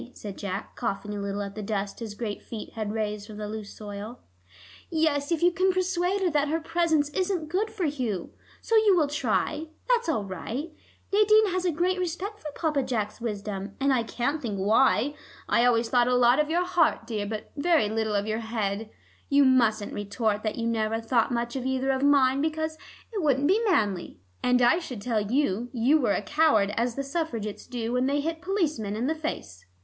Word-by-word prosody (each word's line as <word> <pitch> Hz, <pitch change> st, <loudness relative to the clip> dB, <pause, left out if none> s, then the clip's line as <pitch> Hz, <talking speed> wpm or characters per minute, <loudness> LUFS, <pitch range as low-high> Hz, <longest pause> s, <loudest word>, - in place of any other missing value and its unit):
said 200 Hz, -2 st, -7 dB
Jack, 195 Hz, 0 st, -5 dB
coughing 205 Hz, +1 st, -3 dB
a 205 Hz, -, -4 dB
little 200 Hz, 0 st, -2 dB
at 200 Hz, 0 st, -6 dB
the 215 Hz, -, -6 dB
dust 200 Hz, -1 st, -3 dB
his 220 Hz, -3 st, -6 dB
great 210 Hz, -2 st, -4 dB
feet 225 Hz, -2 st, -8 dB
had 215 Hz, -2 st, -3 dB
raised 210 Hz, -1 st, -3 dB
from 215 Hz, -, -9 dB
the 210 Hz, 0 st, -4 dB
loose 215 Hz, -1 st, -6 dB
soil. 210 Hz, +3 st, -7 dB, 0.7 s
"Yes, 310 Hz, -3 st, +1 dB
if 335 Hz, -1 st, +1 dB
you 350 Hz, -, +6 dB
can 370 Hz, +2 st, +2 dB
persuade 370 Hz, +1 st, 0 dB
her 365 Hz, -, +3 dB
that 295 Hz, -1 st, +2 dB
her 320 Hz, +3 st, 0 dB
presence 325 Hz, -2 st, +1 dB
isn't 360 Hz, -1 st, -1 dB
good 405 Hz, +6 st, 0 dB
for 430 Hz, -5 st, -3 dB
Hugh. 250 Hz, -, -2 dB, 0.3 s
So 455 Hz, -, +1 dB
you 425 Hz, -4 st, +5 dB
will 315 Hz, -, +4 dB
try; 295 Hz, +3 st, -1 dB, 0.2 s
that's 475 Hz, -6 st, +2 dB
all 250 Hz, -10 st, +1 dB
right. 225 Hz, -, -5 dB, 0.4 s
Nadine 425 Hz, +1 st, +5 dB
has 370 Hz, 0 st, -1 dB
a 355 Hz, -, +3 dB
great 360 Hz, +4 st, 0 dB
respect 365 Hz, +4 st, -3 dB
for 300 Hz, -, -7 dB
Papa 305 Hz, -4 st, 0 dB
Jack's 220 Hz, -4 st, -3 dB
wisdom, 200 Hz, -3 st, -4 dB
and 275 Hz, 0 st, +3 dB
I 250 Hz, -, +2 dB
can't 265 Hz, +6 st, -2 dB
think 215 Hz, -5 st, -3 dB
why. 230 Hz, +7 st, +3 dB, 0.3 s
I 235 Hz, -, +3 dB
always 235 Hz, -1 st, +3 dB
thought 245 Hz, -1 st, +3 dB
a 250 Hz, -, +3 dB
lot 245 Hz, +2 st, +5 dB
of 300 Hz, 0 st, +1 dB
your 350 Hz, +2 st, +1 dB
heart, 340 Hz, -9 st, +2 dB
dear, 215 Hz, -3 st, -3 dB
but 215 Hz, 0 st, -6 dB
very 310 Hz, -5 st, +3 dB
little 220 Hz, 0 st, -1 dB
of 200 Hz, 0 st, +1 dB
your 220 Hz, +1 st, -1 dB
head. 220 Hz, -2 st, -3 dB, 0.4 s
You 285 Hz, -1 st, +5 dB
mustn't 230 Hz, -5 st, +3 dB
retort 205 Hz, +1 st, -1 dB
that 215 Hz, -1 st, -2 dB
you 230 Hz, -, -3 dB
never 225 Hz, -1 st, 0 dB
thought 230 Hz, +1 st, +1 dB
much 235 Hz, 0 st, -2 dB
of 260 Hz, -, -2 dB
either 265 Hz, +1 st, +1 dB
of 265 Hz, 0 st, -1 dB
mine, 275 Hz, -1 st, +4 dB
because 315 Hz, 0 st, -1 dB, 0.4 s
it 410 Hz, -, -1 dB
wouldn't 285 Hz, -2 st, +2 dB
be 410 Hz, +7 st, +3 dB
manly, 200 Hz, -, 0 dB, 0.2 s
and 250 Hz, 0 st, +3 dB
I 240 Hz, +8 st, +5 dB
should 255 Hz, -10 st, -7 dB
tell 225 Hz, -3 st, +1 dB
you 240 Hz, 0 st, 0 dB
you 265 Hz, +5 st, +3 dB
were 220 Hz, -5 st, +2 dB
a -, -, -1 dB
coward 255 Hz, -9 st, +3 dB
as 235 Hz, 0 st, 0 dB
the 275 Hz, -, -2 dB
Suffragettes 275 Hz, -8 st, -4 dB
do 235 Hz, -1 st, -3 dB
when 250 Hz, +1 st, +2 dB
they 285 Hz, +1 st, +1 dB
hit 325 Hz, +2 st, -3 dB
policemen 310 Hz, -, -1 dB
in 230 Hz, +3 st, -1 dB
the 310 Hz, -, +1 dB
face." 95 Hz, -, -6 dB
250 Hz, 205 wpm, -27 LUFS, 215-315 Hz, 0.7 s, you